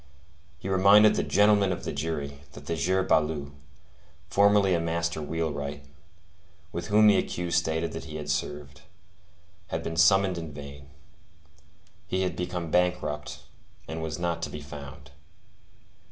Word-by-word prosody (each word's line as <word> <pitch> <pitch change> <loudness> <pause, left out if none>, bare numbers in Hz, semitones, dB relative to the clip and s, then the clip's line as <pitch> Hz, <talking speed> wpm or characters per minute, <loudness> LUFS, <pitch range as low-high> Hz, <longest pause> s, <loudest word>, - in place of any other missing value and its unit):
He 90 - -8
reminded 100 +3 +6
"the - - 0
gentlemen 105 -1 +3
of 90 - -4
the - - -3
jury" 70 -2 -4
that - - -11
"the 85 - -2
sieur 95 +3 +1
Baloup, 75 -5 0 0.8
formerly 100 -1 +4
a 85 - +2
master 85 0 -2
wheelwright, 75 -2 -4 0.9
with 85 - -5
whom 105 +1 +5
the 105 -2 +6
accused 85 -1 0
stated 80 0 -2
that - - -7
he 75 - -9
had 75 -1 -6
served, 70 -1 -4 0.9
had 80 0 -4
been 80 - -4
summoned 95 +2 +4
in 80 -2 -7
vain. 70 -1 -10 1.2
He 95 0 0
had 90 - -2
become 90 -2 -4
bankrupt, 90 -4 -1 0.4
and 80 0 -5
was 80 0 -4
not 85 -1 -2
to - - -3
be 75 - -7
found." 70 -1 -10
80 Hz, 145 wpm, -27 LUFS, 75-95 Hz, 1.2 s, reminded